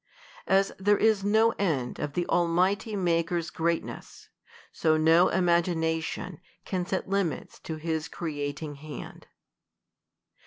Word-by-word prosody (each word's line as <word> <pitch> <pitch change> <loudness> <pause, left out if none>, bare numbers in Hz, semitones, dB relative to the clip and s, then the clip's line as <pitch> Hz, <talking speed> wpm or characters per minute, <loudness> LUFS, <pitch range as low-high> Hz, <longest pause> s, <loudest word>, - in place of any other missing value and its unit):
As 195 +1 +3
there 205 +2 +3
is 220 -3 +3
no 220 +3 +4
end 145 -11 -1
of 145 -1 -3
the 175 +1 -1
Almighty 185 +6 +1
Maker's 170 -2 0
greatness, 165 0 -3 0.4
so 155 -1 +2
no 165 +3 +5
imagina 170 -2 +1
tion 165 +1 -6 0.2
can 180 -2 -2
set 190 - -2
limits 190 -7 -2
to 160 - -6
his 160 0 -3
creating 145 -2 -5
hand. 150 +1 -9
170 Hz, 120 wpm, -28 LUFS, 160-190 Hz, 0.4 s, no